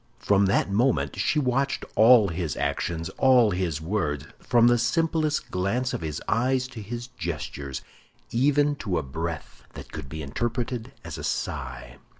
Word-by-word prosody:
From 100 -1 +3
that 100 - +2
moment 120 +7 +1
she - - +1
watched 135 0 0
all 110 -1 +7
his 80 -4 -3
actions, 80 -1 -2
all 125 -5 +5
his 90 -5 -1
words, 80 -5 -2
from 120 -1 +3
the 120 0 +5
simplest 155 +5 0
glance 115 +8 0
of - - -3
his 75 -2 -3
eyes 130 +3 +1
to 115 -4 -8
his 120 +4 -5
gestures—even 95 - -2
to 95 -9 -2
a 80 - -1
breath 80 +3 -5
that - - -10
could 65 - -7
be 80 +1 -6
interpreted 120 - -3
as - - -7
a - - -6
sigh. - - -4
110 Hz, 155 wpm, -26 LUFS, 85-125 Hz, -, all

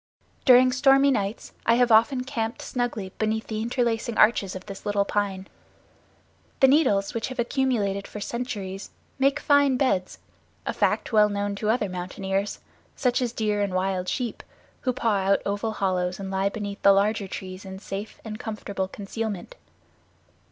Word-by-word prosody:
During 255 -1 +7
stormy 270 +2 +5
nights 205 -3 -2
I 230 - +4
have 245 0 +3
often 240 +4 +4
camped 235 -3 -3
snugly 235 -6 -3
beneath 220 0 0
the 215 -1 -3
interlacing 235 -1 -1
arches 210 -3 +4
of 185 - -8
this 195 -2 -9
little 205 -1 +1
pine. 195 -2 -2 1.1
The 265 - +7
needles, 210 -9 +3
which 230 +1 -2
have 260 0 -7
accumulated 235 -6 0
for 210 - -8
centuries, 205 -4 -5 0.3
make 275 +2 +3
fine 285 -3 +4
beds, 195 -9 0 0.5
a - - -1
fact - - 0
well 210 -1 +6
known 205 0 -2
to 210 +1 -1
other 220 -2 +2
mountaineers, 190 +2 -3 0.3
such 250 -1 +1
as 245 -2 0
deer 210 -3 0
and 200 -2 -1
wild 185 -1 0
sheep, 245 -3 -3 0.4
who 255 - +1
paw 230 -4 +1
out 195 +1 +2
oval 205 +2 -1
hollows 185 -2 -1
and 195 -1 -5
lie 195 +1 +1
beneath 205 -1 -6
the 200 - +7
larger 200 +1 +1
trees 185 0 -7
in 190 -1 -8
safe 195 +2 -7
and 215 -1 -6
comfortable 200 -3 -4
concealment. 205 - -5
210 Hz, 160 wpm, -25 LUFS, 195-245 Hz, 1.1 s, During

